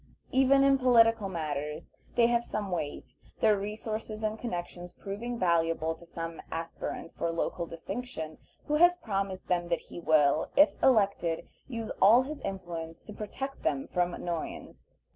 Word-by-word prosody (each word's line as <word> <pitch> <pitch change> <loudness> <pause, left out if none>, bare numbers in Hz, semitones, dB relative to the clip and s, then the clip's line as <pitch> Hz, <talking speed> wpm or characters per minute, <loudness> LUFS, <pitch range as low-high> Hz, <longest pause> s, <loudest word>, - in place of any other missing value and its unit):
Even 270 +1 +5
in 275 -1 +5
political 230 -5 +5
matters 150 -2 -4 0.2
they 235 - +5
have 235 0 +2
some 205 -4 -4
weight, 155 -5 -4 0.3
their 215 -1 +5
resources 215 +1 -4
and 215 0 -1
connections 175 -5 -5
proving 230 +5 -5
valuable 165 -3 +2
to 170 +1 -15
some 165 -1 -6
aspirant 165 0 -5
for 170 - -2
local 170 +1 -2
distinction 165 -2 -6 0.3
who 300 0 +1
has 350 +2 +6
promised 195 - -3
them 175 -1 +1
that 170 -2 0
he - - -5
will, 155 -2 +3
if 295 +2 +7
elected, 200 -9 +2 0.2
use 230 -4 -4
all 225 +6 +7
his 295 +3 -6
influence 170 -4 -5
to 210 - -9
protect 270 +7 -5
them 140 -3 0
from 175 0 0
annoyance. 170 -2 -6
195 Hz, 150 wpm, -30 LUFS, 165-230 Hz, 0.3 s, if